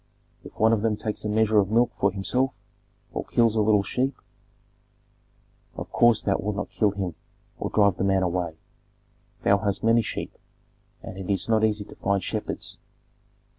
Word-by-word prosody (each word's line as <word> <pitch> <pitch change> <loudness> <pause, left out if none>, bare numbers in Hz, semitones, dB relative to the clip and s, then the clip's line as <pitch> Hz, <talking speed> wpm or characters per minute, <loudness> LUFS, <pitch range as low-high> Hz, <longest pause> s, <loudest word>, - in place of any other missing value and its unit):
If - - -13
one 110 +1 +5
of 110 - +1
them 110 -1 +1
takes 105 0 -4
a - - -1
measure 110 0 +3
of 100 -1 +1
milk 115 +2 +3
for 100 - +3
himself, 125 +7 0 0.6
or - - -3
kills 115 -2 +2
a 110 - +3
little 105 -1 +3
sheep, 130 +6 -1 1.6
of - - -7
course 120 -2 +4
thou 100 - +1
wilt 105 +1 -2
not 100 - -4
kill 105 - +2
him 95 -3 -3 0.5
or - - -2
drive 100 -3 +3
the - - -1
man 95 -1 +2
away. 85 -2 -2 0.9
Thou 100 0 +4
hast 100 -1 -1
many 115 +1 +4
sheep, - - -5 0.7
and 95 - -8
it 95 - -7
is 100 0 0
not 110 -1 +2
easy 105 -1 +1
to - - -13
find 100 -2 0
shepherds." - - -4
105 Hz, 175 wpm, -25 LUFS, 100-110 Hz, 1.6 s, one